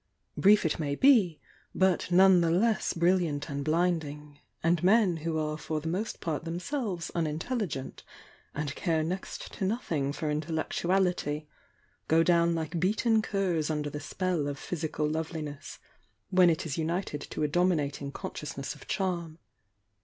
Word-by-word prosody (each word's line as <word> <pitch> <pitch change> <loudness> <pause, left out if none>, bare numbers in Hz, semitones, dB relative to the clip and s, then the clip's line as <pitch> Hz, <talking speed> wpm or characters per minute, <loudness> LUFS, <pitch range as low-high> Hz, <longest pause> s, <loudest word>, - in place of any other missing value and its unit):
Brief 205 -1 +5
it 160 - 0
may 145 -2 -1
be, 210 - +4 0.4
but 185 -2 +2
none 185 0 +6
the 165 - +2
less 215 +7 +2
brilliant 170 -4 +1
and 140 0 -3
blinding; 155 -3 -1 0.2
and 165 0 +2
men 195 -3 +4
who 160 0 -2
are 155 0 -2
for 155 0 -3
the 155 - -6
most 190 +7 -2
part 160 -1 -3
themselves 180 - -3
unintelligent 165 - -3 0.5
and 145 -1 -2
care 160 -3 0
next 180 +4 -5
to - - -5
nothing 170 - -1
for 150 +1 -2
intellectuality, 160 0 0 0.6
go 165 +1 +4
down 170 -1 +3
like 160 +1 -3
beaten 220 +5 +2
curs 185 -7 0
under 150 -1 -2
the 150 - -5
spell 175 -1 -1
of 145 -1 -3
physical 155 -1 -2
loveliness, 155 -2 -4 0.5
when 185 -1 +6
it 165 +2 0
is 160 -1 -3
united 165 -2 -2
to 155 - -4
a - - +3
dominating 150 -4 0
consciousness 140 -1 -5
of - - -15
charm. 170 -5 -2
165 Hz, 145 wpm, -29 LUFS, 150-185 Hz, 0.6 s, none